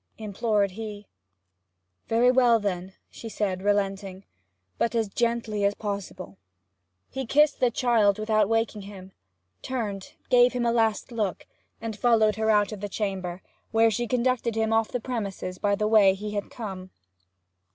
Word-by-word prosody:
implored 210 -1 0
he. 210 0 -7 1.0
'Very 235 +2 +4
well, 245 -3 +4
then,' 190 -2 -3 0.2
said 205 -4 -3
she, - - -11
relenting. 195 -1 -1 0.6
'But 235 - 0
as 225 -2 +1
gently 230 -1 -1
as 200 0 +2
possible.' 200 - -6 0.7
He 265 -2 -4
kissed 295 +3 +3
the 250 - +3
child 225 -4 +2
without 215 -1 +1
waking 225 -2 0
him, 195 -1 -11 0.5
turned, 210 -7 -4 0.2
gave 250 -1 +5
him 245 -1 -1
a 235 - +3
last 225 +1 0
look, 210 -6 -2 0.3
and 225 -1 -5
followed 220 -2 +3
her 220 0 0
out 210 -1 +3
of 210 -2 -7
the 205 - -4
chamber, 190 -3 -4 0.3
when 225 0 +3
she 240 +3 -2
conducted 245 -1 0
him 220 0 +1
off 225 0 +2
the 245 - -3
premises 200 -7 -5
by 205 0 +1
the 210 +1 -1
way 205 -3 +5
he 210 +2 -6
had 205 -1 -4
come. 190 -5 -7
215 Hz, 155 wpm, -26 LUFS, 200-230 Hz, 1.0 s, gave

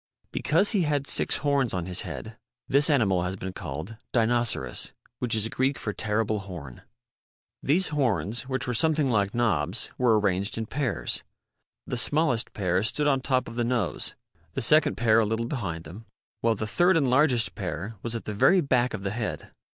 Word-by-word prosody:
Because 185 +7 +2
he 205 - +2
had 145 -3 0
six - - +1
horns 140 -7 +1
on 90 -2 -2
his 90 0 0
head 110 0 -7 0.3
this 145 +3 +3
animal 105 -11 +3
has 90 +2 -2
been 95 0 -6
called 85 +5 -6 0.2
Dinoceras 115 - +1 0.3
.which 125 -3 +1
is 110 0 +1
Greek 135 +3 0
for 105 - -4
Terrible 110 0 -1
Horn. 85 -10 -9 0.8
These 170 +6 +2
horns, 130 -3 -1
which 130 0 0
were 125 - -2
something 155 +1 +2
like 100 -2 +1
knobs, 100 -5 0
were 115 -4 +4
arranged 100 0 0
in 115 - -2
pairs. 135 +2 -1 0.6
The 125 - -3
smallest 125 -2 +1
pair 90 -2 0
stood 135 +7 +1
on 135 -2 +2
top 130 -1 0
of 115 - -8
the 120 - +1
nose, 120 -5 -1 0.4
the - - -2
second 155 +6 +4
pair 115 -1 +4
a - - +4
little 110 +2 -1
behind 95 - -4
them, 100 +9 -11 0.3
while 115 -1 +2
the 110 - -3
third 175 +10 +3
and 140 -4 +2
largest 125 -3 +3
pair 95 +8 -5
was 115 0 -2
at 115 - -5
the 105 - -4
very 180 - +5
back 125 -6 +1
of 95 - -8
the 100 - -2
head. 110 0 -4
115 Hz, 185 wpm, -26 LUFS, 100-135 Hz, 0.8 s, very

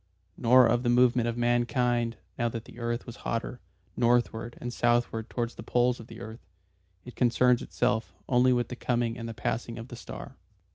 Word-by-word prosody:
Nor 125 +1 +6
of 120 +1 +2
the 120 - 0
movement 120 -1 +4
of 120 0 -2
mankind 120 0 +1 0.2
now 120 0 0
that 115 -1 -6
the - - -13
earth 120 0 -2
was - - -9
hotter, - - -3 0.4
northward 120 -1 +1
and 120 0 -5
southward 120 -2 +1
towards 120 -1 -2
the - - -9
poles 120 +2 +1
of 115 - -11
the 115 - -11
earth. 110 -3 -9 0.6
It 125 - -10
concerns 125 0 +3
itself 120 -2 -1
only 125 0 +4
with 120 -1 +1
the 125 - -5
coming 120 -2 -1
and 115 -1 -6
the 115 - -7
passing 115 0 -3
of 115 +2 -8
the 120 - -7
Star. 115 - -9
120 Hz, 190 wpm, -28 LUFS, 115-120 Hz, 0.6 s, Nor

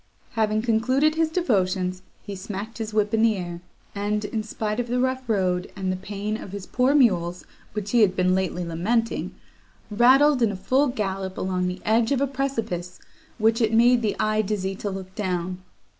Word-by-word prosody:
Having 215 -1 0
concluded 255 +6 +2
his 320 0 +1
devotions, 185 - 0 0.2
he 200 - -6
smacked 205 +4 -6
his 220 -1 -4
whip 210 0 +1
in 220 - +3
the 225 -1 +4
air, 175 -1 -6 0.3
and, 210 +1 -1
in 220 +1 -2
spite 215 +1 -3
of 245 - -1
the 245 +1 0
rough 260 -1 -1
road, 185 -4 0
and 190 -2 -2
the - - -1
pain 205 +3 -4
of 195 - -9
his 200 -2 -6
poor 255 +3 +2
mules, 180 -10 +2 0.3
which 210 -1 -4
he 240 - +4
had 190 -3 +4
been 185 0 +2
lately 185 -1 -1
lamenting, 215 +8 -1 0.6
rattled, 260 +5 +5
in 225 -3 +3
a - - -5
full 260 +9 +2
gallop, 195 -6 -3
along 185 -1 -1
the 180 +1 -5
edge 225 +2 +2
of 275 - +2
a 280 - +2
precipice, 230 -10 -3 0.4
which 225 +1 +2
it 225 0 +2
made 240 +1 +5
the 215 -3 0
eye 215 0 +2
dizzy 195 -2 -2
to 200 +2 -4
look 190 -1 -7
down. 180 -2 -2
210 Hz, 190 wpm, -24 LUFS, 190-235 Hz, 0.6 s, rattled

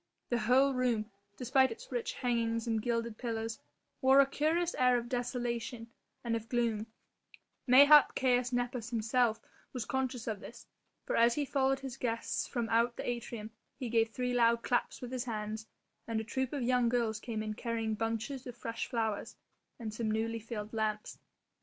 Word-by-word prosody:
The 240 - +1
whole 260 +5 +4
room, 235 -4 0 0.3
despite 260 +1 +3
its 225 - -9
rich 240 -2 -2
hangings 230 -2 0
and 225 -2 0
gilded 230 -1 -2
pillars, 225 -2 -3 0.4
wore 265 +1 +6
a 275 - +8
curious 320 +5 0
air 250 -1 +4
of 240 0 -4
desolation 240 -1 -3 0.3
and 235 -1 0
of 225 0 -5
gloom; 230 -3 0 0.8
mayhap 285 +3 +8
Caius 250 -1 +2
Nepos 245 -1 -2
himself 230 0 +1 0.3
was 250 -4 -3
conscious 260 -2 -2
of 215 -3 -3
this, 235 - -11 0.4
for - - -1
as 235 +1 +5
he 295 - 0
followed 270 0 +1
his 265 -1 -6
guests 230 -3 -2
from 240 -3 -2
out 235 +1 +2
the - - -4
atrium 235 -2 -4 0.3
he 255 -4 -4
gave 225 -1 +3
three 250 +2 -2
loud 235 -1 +3
claps 245 - 0
with 250 -1 -6
his 255 -1 -2
hands, 220 -1 -4 0.4
and 225 -1 -1
a - - -3
troupe 260 +3 -2
of 280 -4 -2
young 250 -1 +3
girls 230 -3 0
came 220 -1 -4
in 215 0 -3
carrying 225 -1 -2
bunches 230 +4 -3
of 245 -1 -8
fresh 230 0 -4
flowers 220 -3 -2 0.4
and 220 -2 -5
some 220 0 -2
newly 225 +1 -1
filled 220 -1 -6
lamps. 215 -1 -2
235 Hz, 175 wpm, -32 LUFS, 225-250 Hz, 0.8 s, a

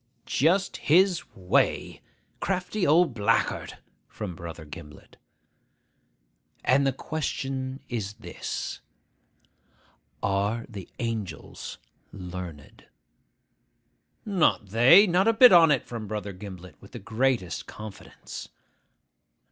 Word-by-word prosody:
('Just 185 +7 +2
his 175 +2 +3
way. 90 -1 0 0.4
Crafty 190 +1 -1
old 160 -1 +4
blackguard!' 105 -3 0 0.3
from 105 -5 -6
Brother 85 0 -8
Gimblet.) 75 0 -12 1.5
'And 135 +2 +4
the - - +3
question 135 -2 -4
is 105 -5 -4
this, - - -6 1.4
Are 100 +4 0
the 100 -7 -9
angels 110 - -5 0.3
learned?' 90 -6 -9 1.4
('Not 175 - +2
they. 125 - +7
Not 185 +2 +2
a 225 - +5
bit 245 +2 +8
on 170 -2 +8
it!' 145 -4 +2
from 115 -3 -6
Brother 105 -1 -4
Gimblet, 90 -4 -10
with - - -16
the - - -6
greatest 115 -3 -1
confidence.) 105 -2 -9
115 Hz, 100 wpm, -27 LUFS, 95-160 Hz, 1.5 s, bit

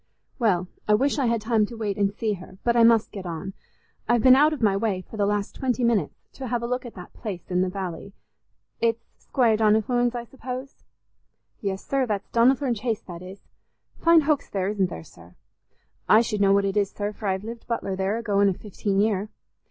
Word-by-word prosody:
"Well, 185 -7 +2 0.2
I 210 - +5
wish 280 +6 +1
I 265 - +2
had 230 -1 +1
time 220 -1 +2
to 235 - -9
wait 210 -3 -2
and 200 -1 +1
see 215 +1 -2
her, 185 0 -10
but 235 0 +2
I 235 - +5
must 230 -1 +4
get 195 -4 -7
on. 175 +3 -5 0.6
I've 240 -2 +3
been 255 0 +8
out 300 +3 +5
of 305 - -3
my 200 -2 +4
way 200 -2 -1
for - - -10
the 205 -2 +1
last 205 -1 -1
twenty 255 -1 -1
minutes 235 -4 0
to 265 - -6
have 240 0 -1
a - - -1
look 250 +1 -2
at 235 - -12
that 180 -2 -11
place 190 -6 -7
in 180 0 +2
the 185 - +1
valley. 190 0 -6 0.7
It's 230 0 0
Squire 235 -4 +2
Donnithorne's, 225 +3 +2
I 240 - -3
suppose?" 260 +2 -8 0.7
"Yes, 195 -2 -4
sir, 270 -2 0
that's 205 -3 -3
Donnithorne 255 +2 +3
Chase, 225 0 -3
that 175 -2 -9
is. 185 +2 -10 0.6
Fine 335 -1 +6
hoaks 295 -1 0
there, 190 -1 -1
isn't 195 -3 0
there, 80 - -7
sir? 85 +1 -17 0.7
I 215 - +7
should 215 -3 -2
know 195 -1 +5
what 200 0 +3
it 195 0 -1
is, 200 -1 +2
sir, 205 0 -4
for 210 0 -6
I've 190 0 -1
lived 230 +1 -8
butler 215 -5 -2
there 190 +3 -1
a 230 - -5
going 200 -2 +3
i' - - +1
fifteen 200 0 -3
year. 210 -1 +1
215 Hz, 220 wpm, -25 LUFS, 195-235 Hz, 0.7 s, been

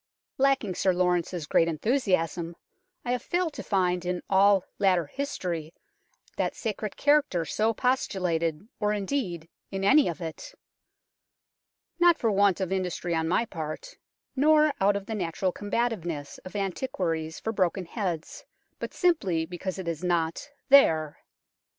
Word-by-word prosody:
Lacking 270 -8 +2
Sir 185 +1 +2
Laurence's 180 -2 0
great 165 +2 +3
enthusiasm, 170 - 0 0.5
I 245 - -1
have 250 -1 0
failed 350 +1 -1
to - - -6
find 180 -3 0
in 180 0 -2
" - - -39
all 195 0 +5
later 185 -4 +3
history 175 - -4 0.3
" - - -35
that - - -1
sacred 215 -2 -4
character 290 - +2
so 220 +6 +1
postulated, 180 - -1
or, 210 -1 +1
indeed, 195 - -2 0.2
in 195 0 -4
any 280 +9 +5
of 170 - -3
it; 160 -3 -7 1.4
not 345 -1 +6
for 225 - +1
want 200 -2 +3
of 190 -1 -2
industry 180 -2 -2
on 160 -1 0
my 185 +7 +2
part, 165 - -7 0.4
nor 305 +2 +4
out 200 +1 +4
of 200 -1 -3
the 220 - -5
natural 185 -1 -1
combativeness 200 -9 -3
of 185 - -11
antiquaries 180 -6 -2
for 225 - -3
broken 185 -2 0
heads, 175 -4 -4 0.4
but - - -6
simply 195 - +1
because 180 +2 -5
it 190 -2 -6
is 165 0 -3
not 170 - -1 0.2
there. 160 - +5
190 Hz, 145 wpm, -27 LUFS, 170-225 Hz, 1.4 s, not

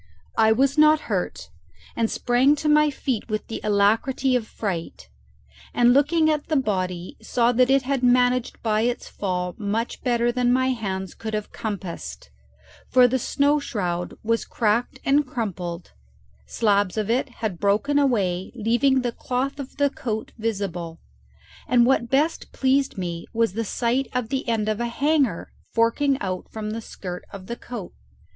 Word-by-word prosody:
I 220 0 +6
was 275 +6 +2
not 305 0 +6
hurt, - - -3 0.4
and 225 -1 +1
sprang 255 +4 +3
to 300 +1 -3
my 300 0 +5
feet 260 -5 -3
with 215 0 -2
the 225 - -6
alacrity 225 +6 +2
of 230 -3 -1
fright, 175 - -5 0.7
and 245 0 +5
looking 310 +4 +3
at 305 -1 0
the 310 - 0
body 185 -8 -1
saw 240 -1 +2
that 250 +1 +3
it 270 0 +4
had 270 0 -1
managed 250 0 +2
by 215 -2 +2
its 245 +1 -1
fall 180 -2 -3
much 215 +3 -2
better 240 -1 +1
than 245 0 +1
my 260 +1 +2
hands 190 -6 -3
could 220 -1 -5
have 210 -1 -4
compassed; 170 - -6 0.6
for 250 -1 +6
the 260 +2 0
snow 285 +4 +2
shroud 180 -10 -3
was 230 +1 +1
cracked 235 +4 0
and 285 +1 +3
crumpled, 180 -8 -4 0.6
slabs 205 -3 +1
of 215 -2 0
it 255 +3 +1
had 220 -7 -4
broken 215 +9 +2
away 195 -10 +1
leaving 240 +4 +2
the 245 -1 -1
cloth 260 +4 -3
of 275 -1 -8
the 285 -1 +2
coat 235 -8 -4
visible, 195 -7 -3 0.7
and 240 -1 +5
what 240 -2 +2
best 295 +5 0
pleased 270 -2 +1
me 170 -2 -4
was 230 -4 +1
the 230 +2 -1
sight 240 +5 0
of 250 -3 -1
the 265 +1 -2
end 220 -2 0
of 215 0 -1
a 240 - -1
hanger 275 - 0 0.2
forking 265 +4 +2
out 185 -2 -4
from 215 -1 -4
the 225 +1 -4
skirt 180 -4 -7
of 195 -2 -9
the 235 - -5
coat. 240 -6 -8
235 Hz, 165 wpm, -24 LUFS, 205-265 Hz, 0.7 s, I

